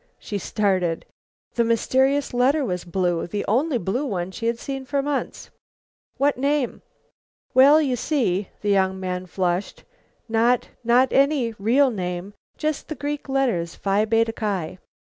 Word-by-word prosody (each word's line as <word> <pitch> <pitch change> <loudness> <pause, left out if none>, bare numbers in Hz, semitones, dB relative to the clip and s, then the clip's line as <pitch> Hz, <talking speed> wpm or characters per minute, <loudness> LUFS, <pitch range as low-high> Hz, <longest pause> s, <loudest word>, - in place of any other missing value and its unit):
She 205 - -5
started. 185 -4 0 0.5
The 235 - +2
mysterious 265 +5 +1
letter 270 +4 +2
was 180 -5 -3
blue; 175 -1 -1
the 205 +4 -3
only 260 +5 +2
blue 225 +7 -2
one 190 -9 -3
she 230 +4 -4
had 235 0 0
seen 270 +2 -5
for 275 +1 -1
months. 290 -1 -3 0.7
"What 280 -2 +1
name?" 280 -1 0 0.7
"Well, 280 +4 +7
you 275 -5 +1
see," 220 - 0
the 210 - -1
young 190 -1 +2
man 185 -1 -4
flushed, 180 +1 -2 0.4
"not 230 +2 +2
not 245 +3 +3
any 275 -4 +2
real 255 +6 +3
name; 180 -1 -4 0.2
just 305 -1 -2
the 310 - -5
Greek 290 +1 -4
letters, 240 -12 0
Phi 200 +2 +1
Beta 225 +1 +2
Ki." 190 -6 -3
230 Hz, 145 wpm, -23 LUFS, 190-270 Hz, 0.7 s, Well